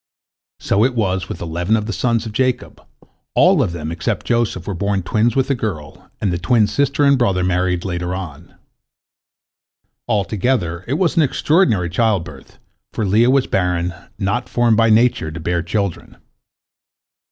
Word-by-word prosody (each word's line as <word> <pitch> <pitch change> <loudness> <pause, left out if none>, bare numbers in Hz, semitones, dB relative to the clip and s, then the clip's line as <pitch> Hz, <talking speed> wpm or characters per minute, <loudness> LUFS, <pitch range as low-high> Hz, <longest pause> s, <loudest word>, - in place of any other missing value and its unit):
So 100 +2 +1
it 125 0 +1
was 95 -4 -1
with 85 - -6
eleven 85 +6 0
of 105 - -3
the 110 - -4
sons 115 -2 0
of 110 - -5
Jacob, 130 +3 -2 0.5
all - - +5
of - - 0
them 80 -2 -5
except 85 -1 -3
Joseph 115 -7 0
were 100 - -3
born 100 +1 -1
twins 110 +7 +1
with 135 -1 +1
a - - +4
girl, 95 - -6
and 95 -4 -1
the 85 - -2
twin 110 +4 +3
sister 140 +5 0
and 140 -2 +4
brother 95 -6 +1
married 90 -1 0
later 90 -1 -3
on. 85 -3 -9 1.5
Altogether 100 -4 -1
it 130 - -1
was 175 +1 0
an - - +6
extraordinary 145 - +2
childbirth, 85 - -2 0.3
for 110 - -2
Leah 110 +5 +3
was 135 0 +3
barren, 90 -2 -1 0.2
not 100 +5 -2
formed 120 -2 +2
by 115 +1 +3
nature 110 -7 +3
to 80 +1 -7
bear 85 +2 -1
children. 100 +1 -3
100 Hz, 165 wpm, -19 LUFS, 90-120 Hz, 1.5 s, an